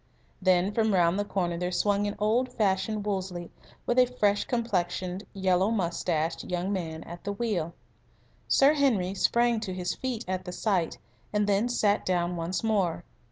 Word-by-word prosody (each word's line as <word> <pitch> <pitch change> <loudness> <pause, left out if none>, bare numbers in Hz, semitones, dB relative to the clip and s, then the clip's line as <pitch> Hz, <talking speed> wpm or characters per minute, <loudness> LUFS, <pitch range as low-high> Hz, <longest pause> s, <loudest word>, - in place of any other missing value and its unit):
Then 185 +1 +3
from 220 -1 +2
round 175 +1 +3
the - - +2
corner 175 -4 -1
there 180 0 -1
swung 205 +2 +1
an 205 - -3
old 230 +5 +1
fashioned 205 -1 0
Wolseley, 185 -4 -3 0.3
with 240 +1 +2
a 250 - +6
fresh 205 -5 +1
complexioned, 190 -5 -2
yellow 190 0 +2
moustached 170 -5 -1
young 180 +2 -2
man 160 -4 -4
at 170 +1 -10
the 200 - -2
wheel. 195 -7 -2 0.7
Sir 275 +2 +5
Henry 230 -11 +2
sprang 235 +3 +2
to 195 -4 -4
his 180 -1 -2
feet 250 -3 -4
at 185 0 -2
the 180 - -6
sight, 180 -3 0 0.3
and 210 0 +1
then 205 +4 +2
sat 210 -4 +2
down 175 -1 0
once 170 +3 -2
more. 195 -7 +1
195 Hz, 165 wpm, -28 LUFS, 180-215 Hz, 0.7 s, a